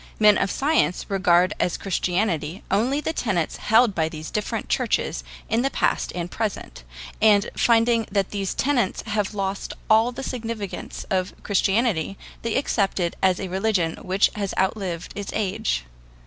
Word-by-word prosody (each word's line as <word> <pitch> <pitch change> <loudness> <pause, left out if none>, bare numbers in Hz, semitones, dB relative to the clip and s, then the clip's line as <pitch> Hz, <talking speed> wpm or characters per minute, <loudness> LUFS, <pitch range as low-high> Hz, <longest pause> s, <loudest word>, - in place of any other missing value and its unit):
Men 210 -1 +7
of 195 - +1
science 280 - +1
regard 185 -1 +3
as 180 - 0
Christianity 180 -2 -1
only 245 +9 +2
the 320 - -2
tenets 185 - -1
held 225 0 +4
by 160 -3 0
the 155 -1 -8
different 210 +6 -3
churches - - 0 0.2
in 225 +2 +1
the 270 - +1
past - - 0
and 175 0 -4
present; 210 - -4 0.4
and 210 -2 +4
finding 230 -1 +3
that 195 -1 0
these 195 -2 -2
tenets 255 -8 +1
have 210 -1 -2
lost 195 0 -3 0.2
all 225 +3 +5
the 270 - -7
significance 230 -6 -5
of 185 0 0
Christianity, 200 -2 +1 0.2
they 230 -1 -2
accept 205 -8 +1
it 170 -1 -1
as 185 -1 +3
a 190 - -3
religion 190 -3 0
which 190 +2 +2
has 200 -2 -3
outlived 185 -3 -1
its 205 -1 -5
age. 205 - -1
200 Hz, 155 wpm, -24 LUFS, 185-225 Hz, 0.4 s, Men